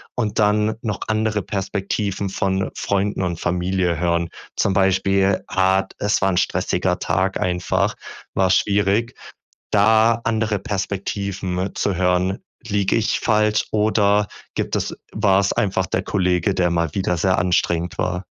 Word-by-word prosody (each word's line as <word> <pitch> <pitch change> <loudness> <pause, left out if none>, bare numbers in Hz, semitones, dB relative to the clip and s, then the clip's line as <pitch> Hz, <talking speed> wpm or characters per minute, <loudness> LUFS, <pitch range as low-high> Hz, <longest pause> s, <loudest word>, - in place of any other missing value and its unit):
Und 110 -3 -1
dann 105 +1 +2
noch 105 -3 -3
andere 110 -1 0
Perspektiven 100 0 -2
von, 95 0 0
äh, - - -10
Freunden 100 0 -1
und 85 -2 -2
Familie 90 -1 0
hören. 85 0 0 0.3
Zum 100 - +2
Beispiel 95 0 +2
Art 95 +1 +1
es 105 0 +1
war 95 - +3
'n - - -1
stressiger - - 0
Tag 95 +1 0
einfach, 90 -1 0 0.4
war 95 -1 +2
schwierig, 105 +4 +2 0.6
da 110 +2 +4
andere 110 -3 0
Perspektiven 100 -2 -3
zu 100 -3 0
hören. 90 +1 +1 0.3
Liege 100 -3 +1
ich 110 - 0
falsch 105 -1 +2
oder 105 -1 +2 0.3
gibt - - -2
es - - -2 0.2
war's 100 0 +2
einfach 95 -2 0
der - - -1
Kollege, 90 0 +1
der 90 -1 +2
mal 85 -2 0
wieder 95 -2 0
sehr 95 +2 +2
anstrengend 90 -1 0
war? 90 0 -2
95 Hz, 140 wpm, -21 LUFS, 90-105 Hz, 0.6 s, da